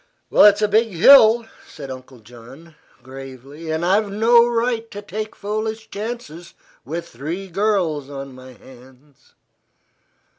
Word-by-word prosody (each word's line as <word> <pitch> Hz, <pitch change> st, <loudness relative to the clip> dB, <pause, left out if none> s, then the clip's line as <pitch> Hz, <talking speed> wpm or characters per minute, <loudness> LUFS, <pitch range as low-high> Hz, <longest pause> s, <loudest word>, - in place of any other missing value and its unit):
"It's 210 Hz, 0 st, +5 dB
a -, -, +3 dB
big 220 Hz, +3 st, +2 dB
hill," 225 Hz, +4 st, +6 dB, 0.2 s
said 140 Hz, -3 st, -10 dB
Uncle 130 Hz, -1 st, -12 dB
John, 125 Hz, +9 st, -15 dB, 0.3 s
gravely, 135 Hz, +4 st, -11 dB
"and 160 Hz, +2 st, -2 dB
I've 200 Hz, +3 st, +1 dB
no 235 Hz, +3 st, +4 dB
right 230 Hz, -1 st, -2 dB
to 205 Hz, -, -8 dB
take 215 Hz, +1 st, -7 dB
foolish 220 Hz, +2 st, -5 dB
chances 205 Hz, -6 st, -8 dB, 0.3 s
with 165 Hz, +6 st, -6 dB
three 165 Hz, +10 st, -7 dB
girls 180 Hz, -7 st, -1 dB
on 135 Hz, -1 st, -8 dB
my 130 Hz, 0 st, -13 dB
hands." 130 Hz, +2 st, -20 dB
170 Hz, 125 wpm, -20 LUFS, 135-215 Hz, 0.3 s, hill